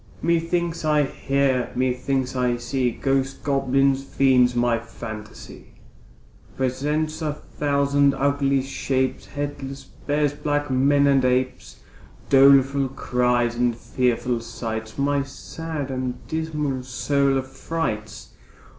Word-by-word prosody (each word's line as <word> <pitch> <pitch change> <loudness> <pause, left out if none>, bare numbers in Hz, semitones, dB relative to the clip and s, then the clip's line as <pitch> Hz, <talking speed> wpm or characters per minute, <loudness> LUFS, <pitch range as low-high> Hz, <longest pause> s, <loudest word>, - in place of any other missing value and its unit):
Methinks 170 0 0
I 150 -1 +3
hear, 135 -2 0
methinks 130 +1 -1
I 125 -1 +1
see 125 +1 -1
Ghosts, 135 +2 -1
goblins, 135 -1 +1
fiends; 130 -3 +3
my 120 -1 +2
phantasy 110 -2 -10 0.8
Presents 150 +5 -1
a 155 -2 -1
thousand 140 -1 +1
ugly 140 -1 +1
shapes, 130 -1 -2
Headless 140 -2 -5
bears, 145 +2 -1
black 145 -1 -2
men, 140 +2 +3
and 135 -2 +4
apes, 125 - -1 0.5
Doleful 135 0 +6
outcries, 125 -2 0
and 120 -1 +1
fearful 125 -1 0
sights, 110 -1 -6
My 140 0 +1
sad 145 +1 -6
and 130 -1 -2
dismal 150 -4 -2
soul 135 +2 +1
affrights. 130 -5 -4
135 Hz, 105 wpm, -23 LUFS, 125-145 Hz, 0.8 s, Doleful